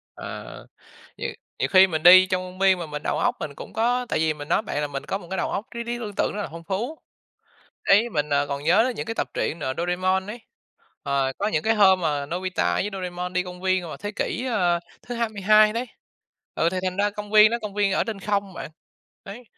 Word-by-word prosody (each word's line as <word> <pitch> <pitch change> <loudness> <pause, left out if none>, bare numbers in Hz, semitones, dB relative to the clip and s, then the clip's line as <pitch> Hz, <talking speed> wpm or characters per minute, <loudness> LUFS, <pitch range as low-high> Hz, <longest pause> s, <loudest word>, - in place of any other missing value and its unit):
Ờ, - - -8 0.5
nhiều - - -3 0.3
nhiều - - 0
khi 190 0 +8
mình 160 -4 -3
đi 185 +1 +9
trong 185 0 -1
công 185 0 -10
viên 190 -1 +4
mà 170 - -5
mình 150 0 -6
đầu - - -1
óc - - +1
mình 145 -2 -5
cũng - - -10
có 245 +3 0
tại - - 0
vì 155 -1 +1
mình 145 0 -9
nói - - +2
bạn 145 - -3
là 150 - -1
mình 140 -1 -6
có 195 - -2
một 175 - -13
cái 190 - -2
đầu - - -1
óc 205 - -3
trí 235 - -5
trí 240 0 -3
tưởng 215 -3 -6
tượng - - +1
rất 205 - -3
là - - -5
phong 165 0 -9
phú. 230 - -3 0.9
Đấy, 210 +4 +5
mình, 150 -3 -1
ờ, 145 0 +2
còn 140 0 -4
nhớ 180 +8 +4
đến 255 - -1
những - - -4
cái 225 - -3
tập - - -2
truyện, 160 +2 -2
ờ, 130 -2 -2
Doraemon 185 +2 0
ấy, 230 +3 -7 0.6
ờ, 140 -2 0
có 205 - 0
những 155 -7 0
cái 225 +1 +2
hôm 190 -3 +5
mà 145 -4 -1
Nobita 185 +3 -1
với 205 - -1
Doraemon 180 -1 -5
đi 180 0 +1
công 180 0 -9
viên 185 -1 +1
vào 160 - -7
thế 205 - -5
kỷ, 250 - -2
ơ, 175 -6 +1 0.2
thứ 245 0 -6
22 215 -2 +3
đấy, 235 +3 -2 0.7
ừ, 165 - +2
thì 185 - -1
thành 185 0 -2
ra 205 +1 +2
công 210 0 -8
viên 215 0 +7
đó, 235 - -1
công 205 -1 -6
viên 205 -2 +1
ở - - +1
trên 220 -3 -5
không 200 -1 -1
bạn. - - -7 0.5
Đấy, 215 +5 -9
190 Hz, 250 wpm, -24 LUFS, 170-210 Hz, 0.9 s, đi